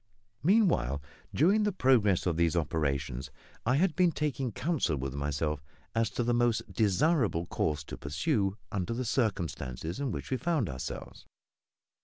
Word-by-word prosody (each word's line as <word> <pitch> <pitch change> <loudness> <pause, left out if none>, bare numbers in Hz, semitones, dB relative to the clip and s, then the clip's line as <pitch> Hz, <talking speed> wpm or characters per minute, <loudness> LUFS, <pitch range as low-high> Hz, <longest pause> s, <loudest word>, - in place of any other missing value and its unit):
Meanwhile, 170 - +3 0.3
during 175 - +4
the 210 0 +2
progress 120 - +3
of 85 -3 +1
these 85 -1 +2
operations 70 -6 -1 0.4
I 125 - +4
had 170 +1 +2
been 180 0 +4
taking 140 -5 -1
counsel 140 - 0
with 65 0 -3
myself 70 +1 -2 0.3
as 115 0 +1
to 120 - +2
the 120 +1 +1
most 120 -1 +1
desirable 110 - +2
course 75 -3 -1
to - - -8
pursue 100 - 0
under 105 +2 -2
the 130 +1 -2
circumstances 85 - -2
in 140 -2 -1
which - - -5
we 130 - +2
found 160 - 0
ourselves. 65 0 -7
105 Hz, 150 wpm, -30 LUFS, -, 0.4 s, during